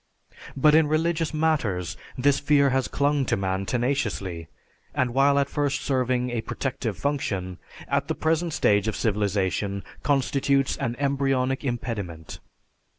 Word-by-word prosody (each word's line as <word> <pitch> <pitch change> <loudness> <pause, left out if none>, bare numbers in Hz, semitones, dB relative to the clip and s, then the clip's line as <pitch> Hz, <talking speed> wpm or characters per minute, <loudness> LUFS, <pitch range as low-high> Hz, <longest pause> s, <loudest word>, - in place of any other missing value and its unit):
But 150 +3 +5
in 160 -1 +5
religious 160 +1 0
matters 145 - 0 0.2
this 140 +2 +3
fear 140 -1 +3
has 130 -1 +1
clung 145 0 +1
to - - +1
man 95 0 -2
tenaciously; 115 - -1 0.5
and 125 -2 0
while 140 +2 +4
at 140 -1 +2
first 145 -1 -1
serving 125 -2 0
a 120 -2 -1
protective 125 -5 -3
function, 95 -11 -2 0.3
at 140 0 0
the 160 - -1
present 165 +1 0
stage 105 -4 +2
of 110 - -1
civilization 100 -2 -1 0.2
constitutes 140 -1 +1
an 120 - -2
embryonic 135 -1 0
impediment. 105 - -4
130 Hz, 135 wpm, -25 LUFS, 105-145 Hz, 0.5 s, But